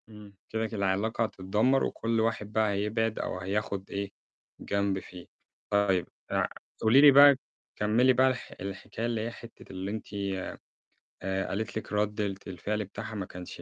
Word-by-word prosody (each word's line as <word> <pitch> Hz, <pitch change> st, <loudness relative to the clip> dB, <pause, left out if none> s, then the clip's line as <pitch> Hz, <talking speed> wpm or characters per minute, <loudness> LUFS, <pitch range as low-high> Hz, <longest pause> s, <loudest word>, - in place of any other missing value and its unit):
إمم. 105 Hz, -2 st, -12 dB, 0.2 s
كده، 110 Hz, 0 st, -1 dB
كل 110 Hz, -, -7 dB
العلاقة 100 Hz, +4 st, +1 dB
هتتدمّر 105 Hz, +5 st, +1 dB
وكل 115 Hz, 0 st, 0 dB
واحد 110 Hz, -2 st, 0 dB
بقى 110 Hz, -1 st, +3 dB
هيبعد 105 Hz, +2 st, 0 dB
أو 90 Hz, -, -3 dB
هياخُد 100 Hz, +1 st, -2 dB
إيه، 100 Hz, 0 st, -3 dB, 0.5 s
جنب 100 Hz, -1 st, 0 dB
فيه. 90 Hz, -1 st, -11 dB, 0.4 s
طيب 100 Hz, -4 st, +2 dB, 0.2 s
آآ، -, -, +1 dB, 0.3 s
قولي 115 Hz, +5 st, +6 dB
لي 145 Hz, -1 st, +10 dB
بقى، 140 Hz, +1 st, +9 dB, 0.4 s
كمِّلي 115 Hz, +5 st, +4 dB
بقى 130 Hz, +1 st, +5 dB
الح 130 Hz, -1 st, -2 dB
الحكاية 100 Hz, +4 st, -5 dB
اللي 115 Hz, -2 st, -1 dB
هي 115 Hz, +2 st, -3 dB
حتّة 115 Hz, 0 st, -12 dB
اللي 95 Hz, +1 st, -4 dB
أنتِ 110 Hz, -, -5 dB, 1.2 s
آآ، 95 Hz, 0 st, -1 dB
قالت 110 Hz, +2 st, -3 dB
لكِ 110 Hz, -, -6 dB
رَدّة 105 Hz, 0 st, +1 dB, 0.2 s
الفعل 105 Hz, +3 st, -2 dB
بتاعها 110 Hz, +3 st, -7 dB
ما 100 Hz, -2 st, -3 dB
كانش 90 Hz, -1 st, -9 dB
105 Hz, 160 wpm, -29 LUFS, 100-115 Hz, 1.2 s, لي